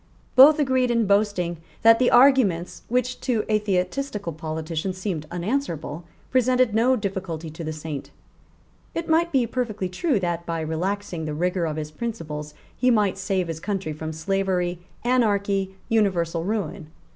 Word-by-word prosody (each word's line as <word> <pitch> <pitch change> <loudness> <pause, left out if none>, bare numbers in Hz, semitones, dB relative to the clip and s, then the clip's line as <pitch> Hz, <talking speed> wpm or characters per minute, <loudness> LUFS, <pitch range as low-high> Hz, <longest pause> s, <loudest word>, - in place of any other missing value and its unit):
Both 285 +4 +9
agreed 260 -4 +2
in 235 -2 +2
boasting 200 -4 +1 0.3
that 225 0 +7
the 255 - +4
arguments 215 -10 +4
which 250 +1 -1
to 235 -5 0
atheistical 210 - -1
politicians 160 +3 -4
seemed 180 -6 -3
unanswerable 175 - -3 0.3
presented 255 -2 +3
no 240 +4 +4
difficulty 190 -7 -4
to 165 +2 -7
the 155 - -3
Saint. 155 -2 -6 0.9
It 335 0 -3
might 335 +1 +2
be 260 -4 +3
perfectly 220 -6 -2
true 240 - 0
that, 175 -2 -2
by 165 -1 -3
relaxing 175 +2 -3
the 150 -1 -3
rigour 180 +2 0
of 155 -2 -2
his 155 -1 -4
principles, 155 -7 -5 0.2
he 255 - +2
might 210 -5 +2
save 185 -2 -1
his 165 -1 -4
country 195 -4 -3
from 155 +1 -5
slavery, 180 +1 -1 0.2
anarchy, 200 -6 +1
universal 175 -7 +1
ruin. 200 -5 -3
195 Hz, 145 wpm, -24 LUFS, 165-235 Hz, 0.9 s, Both